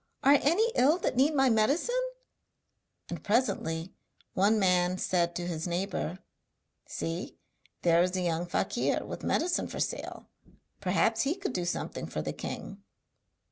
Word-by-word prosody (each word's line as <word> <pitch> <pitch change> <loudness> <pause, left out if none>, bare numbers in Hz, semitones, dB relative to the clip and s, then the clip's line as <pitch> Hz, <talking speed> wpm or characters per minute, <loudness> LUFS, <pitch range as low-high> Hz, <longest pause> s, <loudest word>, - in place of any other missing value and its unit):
Are 280 +1 +6
any 350 +11 +3
ill 290 +7 +4
that 345 - -1
need 280 +5 +3
my 270 -1 +4
medicine?' 275 - +2 1.1
And - - -6
presently 190 -7 0 0.4
one 205 +4 +3
man 180 -2 +3
said 175 -2 0
to 175 - -3
his 165 -1 -3
neighbour: 175 -1 -2 0.7
'See, 165 +4 -4 0.5
there 170 0 +5
is 180 +1 +1
a - - 0
young 170 0 -1
fakir - - 0
with - - -6
medicine 345 +2 +1
for - - -6
sale, - - -3 0.5
perhaps 220 +4 +2
he 285 +7 +1
could 390 -8 -4
do 180 -1 -1
something 175 - -3
for - - -4
the - - -3
king.' 200 0 -6
195 Hz, 145 wpm, -29 LUFS, 175-270 Hz, 1.1 s, Are